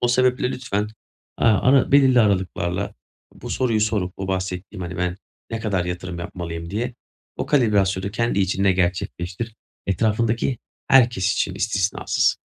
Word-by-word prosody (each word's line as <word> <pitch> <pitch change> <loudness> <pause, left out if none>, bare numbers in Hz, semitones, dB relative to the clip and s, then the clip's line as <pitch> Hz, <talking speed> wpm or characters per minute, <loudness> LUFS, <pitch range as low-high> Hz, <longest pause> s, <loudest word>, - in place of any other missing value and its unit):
O 120 - +2
sebeple 125 0 +2
lütfen, 110 -5 -2
eee, 110 +2 -6
ara 130 +6 +4
belirli 130 -3 +6
aralıklarla 95 -2 0 0.4
bu - - -9
soruyu 115 -4 +1
sorup 105 -4 0
bu 95 0 -4
bahsettiğim, 95 +1 -3
hani, 90 +1 -5
"Ben 90 0 -1 0.3
ne 115 -1 -3
kadar 100 -5 0
yatırım 90 0 -5
yapmalıyım?" 85 -1 -6
diye, 120 +4 -2 0.4
o - - -3
kalibrasyonu 100 -7 +2
kendi 115 0 0
içinde 95 0 +2
gerçekleştir. 90 +4 -2 0.3
Etrafındaki 110 +5 +1 0.3
herkes 115 -7 +4
için 95 -1 -1
istisnasız. 100 -1 +1
100 Hz, 135 wpm, -22 LUFS, 90-115 Hz, 0.4 s, belirli